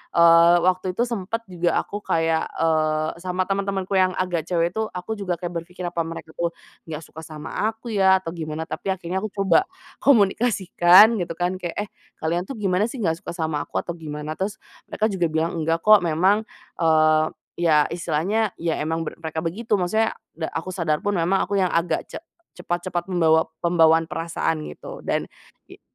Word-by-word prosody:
eee, 170 0 +7
waktu 185 0 +1
itu 235 - +2
sempet 230 -1 -3
juga 175 -1 0
aku 205 - -6
kayak, 165 -4 0
eee, 155 -1 0
sama 185 +1 -1
teman-temanku 195 0 -2
yang 185 0 +2
agak 175 -3 -2
cewek 170 -1 +1
tuh 220 +3 -2
aku 195 +5 -5
juga 185 -3 -1
kayak 175 +1 -5
berpikir, 180 +1 -10
"Apa 170 -2 -2
mereka 165 -1 -8
tuh 170 +1 -3 0.3
nggak 160 0 -6
suka 155 - -12
sama 155 +6 -3
aku 225 +2 -5
ya 190 -2 +4
atau 165 - -4
gimana?" 160 -2 -5
Tapi 160 - -7
akhirnya 190 -1 -2
aku 215 - -3
coba 200 - +3 0.3
komunikasikan 210 -3 +5
gitu 170 -2 -3
kan, 180 +2 -2
kayak, 175 -2 -5
"Eh, 210 0 -3 0.3
kalian 170 +3 -1
tuh 270 - -6
gimana 200 -1 +1
sih 240 -1 -6
nggak 165 -2 0
suka 185 - -7
sama 160 -3 -2
aku - - -4
atau - - -4
gimana?" 150 -1 -6
Terus 195 +1 -2 0.3
mereka 215 0 -1
juga 180 -3 +1
bilang, 160 +2 -1
"Nggak 165 +1 0
kok," 215 -1 +8
memang, 185 +7 +3 0.4
eee, 155 -1 +4 0.4
ya 155 -4 +3
istilahnya 175 +6 -1
ya 165 -1 0
emang 160 +2 -2
ber 165 - -6
mereka 160 -1 -4
begitu, 210 +8 -3
maksudnya 220 +5 +1 0.2
da 165 - -2
aku 165 +3 -4
sadar 165 -5 -1
pun 205 -1 0
memang 175 +3 +2
aku 200 - -1
yang 185 -2 +1
agak 165 -1 0
ce - - -9 0.4
cepat-cepat 175 +1 -3
membawa 160 -3 +3
pembawaan 165 -1 +4
perasaan 165 -1 -2
gitu - - -9
dan - - -1 0.4
i - - -16
175 Hz, 185 wpm, -23 LUFS, 165-195 Hz, 0.4 s, kok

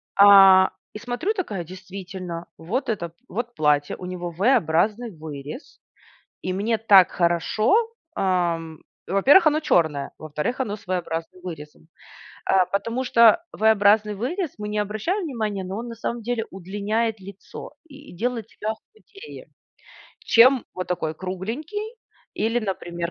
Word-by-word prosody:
А, 195 -2 +8 0.2
и 210 - -7
смотрю 245 - -2
такая: 205 - -4
действительно, 185 -2 -8
вот 235 - -3
это, 170 -6 -3 0.2
вот 240 +1 -4
платье, 145 -1 +1
у 180 - -8
него 175 -1 -5
V-образный 210 - +1
вырез. 155 - -9 0.6
И 185 - -2
мне 220 +4 0
так 200 -4 +6
хорошо! 175 - +1 0.4
А, 180 -3 +1
м, 160 -1 -11 0.2
во-первых, 275 - +5
оно 310 +1 +3
черное. 150 - +1
Во-вторых, 155 - -4
оно 210 -4 -3
с 205 - -17
V-образным 175 -1 -4
вырезом. 160 -2 -9 0.6
Э, 190 -1 +4
потому 230 +6 -1
что 235 +5 +5
V-образный 210 -1 +3
вырез 300 - -3
Мы 210 0 -4
не 210 - -3
обращаем 215 - -2
внимание, 215 - -3
но 190 +3 -5
он 240 - -6
на 230 - -7
самом 235 +1 -4
деле 230 0 -2
удлиняет 205 +4 -2
лицо 195 +1 -10 0.2
и 285 - -14
делает 235 +1 -2
тебя 215 - -6
худее. 440 - -14 0.7
Чем 250 +2 +5
вот 185 -1 -4
такой 160 -3 -2
кругленький 260 - -5 0.4
или, 225 +3 0
например, 175 -4 -4
200 Hz, 140 wpm, -23 LUFS, 180-235 Hz, 0.7 s, А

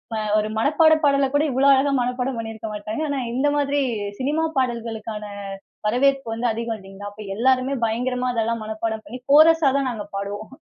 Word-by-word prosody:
அ - - -1 0.2
ஒரு 215 0 -2
மனப்பாட 315 +6 +4
பாடல 280 -1 +4
கூட 290 +1 +3
இவ்ளோ 265 +2 +3
அழகா 270 +1 +3
மனப்பாடம் 250 +1 -2
பண்ணிருக்க 225 -1 -6
மாட்டாங்க. 215 +5 -4
ஆனா, 285 - -1 0.2
இந்த 265 +4 +1
மாதிரி 285 0 +1 0.4
சினிமா 295 +5 0
பாடல்களுக்கான 225 -4 -2 0.6
வரவேற்பு 270 +4 +2
வந்து 235 +2 -2
அதிகம் 230 0 -3
இல்லீங்களா? 195 +1 -9
அப்ப 210 +1 -11
எல்லாருமே 260 +3 +2
பயங்கரமா 250 +3 -1
அதெல்லாம் 230 0 -1
மனப்பாடம் 220 0 -4
பண்ணி, 250 - -7
கோரஸா 315 0 +6
தான் 275 -2 0
நாங்க 215 -4 -6
பாடுவோம். 205 +2 -5
245 Hz, 165 wpm, -22 LUFS, 220-275 Hz, 0.6 s, கோரஸா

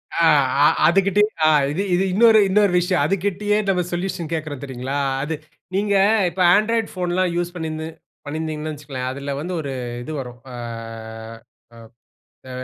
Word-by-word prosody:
ஆ 170 - +3 0.4
அ - - +8 0.2
அதுகிட்டயே 195 +4 +3 0.2
ஆ - - +6 0.2
இது 170 - -2
இது 180 +2 +3
இன்னொரு 220 +2 +6
இன்னொரு 205 0 +3
விஷயம். 180 +1 +1
அதுகிட்டயே 205 +2 0
நம்ம 180 -2 +2
சொல்யூஷன் 175 -2 -3
கேக்குறோம் 155 -4 -4
தெரியுங்களா? 135 +1 -4 0.2
அது. 160 +2 -2 0.4
நீங்க 200 +1 +1 0.3
இப்ப 180 +2 -4
ஆண்ட்ராய்ட் 225 +1 +1
போன்லாம் 180 0 0
யூஸ் 175 0 -2
பண்ணியிருந்து 160 -1 -4 0.4
பண்ணியிருந்தீங்கன்னு 155 +1 -4
வச்சுக்கங்களேன். 140 -4 -5
அதில 140 +1 -5
வந்து 175 +5 -4
ஒரு 140 -2 -5 0.3
இது 155 - -7
வரும். 125 -1 -8
ஆ - - -9 2.0
அ - - -9
175 Hz, 140 wpm, -21 LUFS, 150-195 Hz, 2.0 s, அ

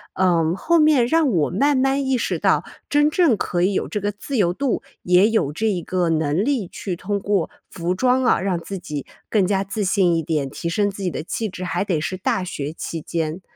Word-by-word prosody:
嗯， 170 -2 +2
后 340 +1 +2
面 300 -6 +4
让 320 -1 +3
我 160 -6 +1
慢 280 +9 +2
慢 270 +1 +1
意 265 -1 +1
识 - - -1
到 - - +2 0.2
真 295 +1 +4
正 305 - +3
可 175 -2 -1
以 195 +2 +2
有 - - -1
这 210 - -3
个 205 0 0
自 240 +7 -6
由 180 -6 +3
度， 275 +3 -1 0.2
也 180 +4 +5
有 150 -11 0
这 220 +6 -1
一 185 -5 0
个 180 -2 -1
能 160 +3 +1
力 250 -8 0
去 180 -1 -5
通 200 +3 -2
过 200 -3 0 0.2
服 175 +1 -2
装 255 +4 +2
啊， 240 - +3
让 185 -3 0
自 195 +3 -6
己 150 -6 -6 0.2
更 200 -4 +2
加 195 0 +1
自 200 +2 -3
信 185 -3 +3
一 165 - +1
点， 150 -4 -1
提 170 - -5
升 205 +4 +1
自 195 - -9
己 185 - 0
的 155 - -5
气 220 +6 -3
质， 185 -2 -7
还 185 +2 -1
得 165 -6 0
是 185 +4 -3
大 185 0 0
学 150 -4 -4
期 165 -1 -5
间。 165 +2 -3
190 Hz, 250 characters per minute, -22 LUFS, 170-230 Hz, 0.2 s, 也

